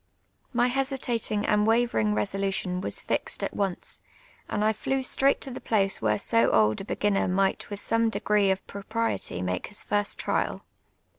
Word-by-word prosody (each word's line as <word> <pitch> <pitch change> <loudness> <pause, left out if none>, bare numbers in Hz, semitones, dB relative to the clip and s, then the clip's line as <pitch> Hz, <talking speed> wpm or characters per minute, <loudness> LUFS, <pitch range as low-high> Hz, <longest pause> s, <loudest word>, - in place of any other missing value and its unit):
My 240 0 +2
hositatinjT 250 -5 -1
and 210 0 +3
waverin<? 225 - +2
resolution 185 - -1
was - - -1
fixed - - -2
at - - -2
once, 195 -3 -2 0.5
and 210 0 0
I 220 - +3
flew 265 +5 -1
straight 270 +2 +3
to 270 - -3
the - - -7
place 195 -3 +2
Avhere 105 -1 +1
so 230 0 +3
old 110 - +3
a - - -7
beginner 205 -1 0
might 190 +1 0
with 205 -1 -5
some 230 +1 +1
degi*ec 210 -3 +2
of 190 0 -2
proi)riety 200 - -2
make 90 0 -2
his 205 - -3
first 205 0 0
trial. - - -1
205 Hz, 165 wpm, -27 LUFS, 190-230 Hz, 0.5 s, and